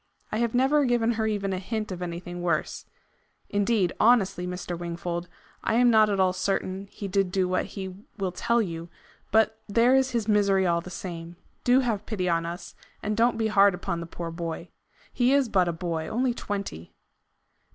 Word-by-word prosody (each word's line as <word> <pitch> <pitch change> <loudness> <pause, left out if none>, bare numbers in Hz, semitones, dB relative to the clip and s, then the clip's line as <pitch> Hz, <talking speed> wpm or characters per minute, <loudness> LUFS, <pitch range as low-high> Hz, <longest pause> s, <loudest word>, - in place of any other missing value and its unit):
I - - -1
have 235 0 0
never 275 +4 +4
given 240 -3 +2
her 220 -1 0
even 200 -2 -1
a 185 - -2
hint 215 +1 -4
of 180 -1 -5
anything 175 0 -5
worse. 170 -3 -1 0.6
Indeed, 205 -2 +2
honestly, 200 -6 +3
Mr. 180 -1 -4
Wingfold, 170 0 -4 0.3
I 220 - +1
am 245 0 +5
not 215 -1 +5
at 200 -1 0
all 185 -1 +3
certain 190 +1 -2
he 200 0 -7
did 195 -1 +1
do 185 -1 +1
what 185 0 0
he 190 -1 -6 0.2
will 190 -3 -1
tell 235 +5 +1
you. 170 -2 -6 0.4
But 220 0 +3
there 235 +5 +4
is 265 0 +3
his 235 -4 -1
misery 200 -3 +3
all 170 -1 +2
the 180 - -9
same. 170 -2 -7 0.3
Do 250 +2 +5
have 220 -5 -2
pity 190 -5 -2
on 165 -1 +1
us, 175 +2 -7 0.3
and 210 0 -1
don't 235 +2 +3
be 225 - 0
hard 200 -3 +5
upon 170 -1 -3
the 170 - -6
poor 170 0 -6
boy. 170 0 -5 0.4
He 250 +1 +3
is 280 -4 +3
but 185 -4 +3
a - - +1
boy 165 -1 -3
only 245 +5 0
twenty." 195 - -5
195 Hz, 195 wpm, -26 LUFS, 175-225 Hz, 0.6 s, am